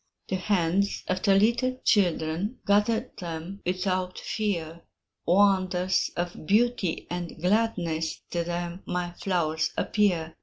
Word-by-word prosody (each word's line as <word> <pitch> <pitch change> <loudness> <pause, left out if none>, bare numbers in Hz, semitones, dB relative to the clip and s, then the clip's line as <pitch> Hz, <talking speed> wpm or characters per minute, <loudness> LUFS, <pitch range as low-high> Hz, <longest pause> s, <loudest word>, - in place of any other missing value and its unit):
The 190 - 0
hands 190 0 +1
of 185 0 -1
the 195 - +4
little 240 +5 +2
children 180 +2 +1
Gather 220 +4 +2
them 170 +3 -6
without 185 0 -1
fear; 170 -6 -3 0.5
Wonders 185 -1 +3
of 175 -3 -4
beauty 215 -4 +2
and 175 -2 -5
gladness 175 -4 0
To 170 -1 0
them 175 +1 -4
my 180 -1 -2
flowers 165 -4 0
appear. 170 -6 +1
185 Hz, 115 wpm, -27 LUFS, 170-205 Hz, 0.5 s, the